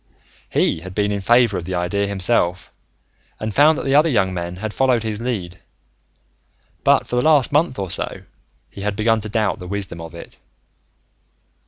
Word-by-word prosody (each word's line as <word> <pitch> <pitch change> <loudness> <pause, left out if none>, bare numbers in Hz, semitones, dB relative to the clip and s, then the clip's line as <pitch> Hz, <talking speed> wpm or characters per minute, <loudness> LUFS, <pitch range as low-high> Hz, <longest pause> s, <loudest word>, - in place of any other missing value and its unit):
He - - +1
had 95 +2 -10
been 105 -1 +1
in 100 -1 -2
favor 115 -2 +3
of 85 - -8
the 95 +1 -3
idea 90 +3 -1
himself 95 -2 0 0.7
and 110 -1 -4
found 150 +4 +5
that - - -4
the 135 - +1
other 150 +3 +5
young 95 -8 +1
men 85 0 -4
had 105 +3 -5
followed 130 -4 +2
his 110 -1 -3
lead. 95 -8 -4 1.2
But, - - +4
for 125 - -3
the - - +3
last 145 -3 +4
month 150 -1 +1
or 95 -3 -3
so, - - -3 0.5
he 100 - -9
had 105 0 -2
begun 110 +1 +1
to 110 - -6
doubt 110 -1 0
the 90 - -8
wisdom 95 -3 -3
of 80 +1 -9
it. 85 - -11
105 Hz, 185 wpm, -20 LUFS, 90-120 Hz, 1.2 s, found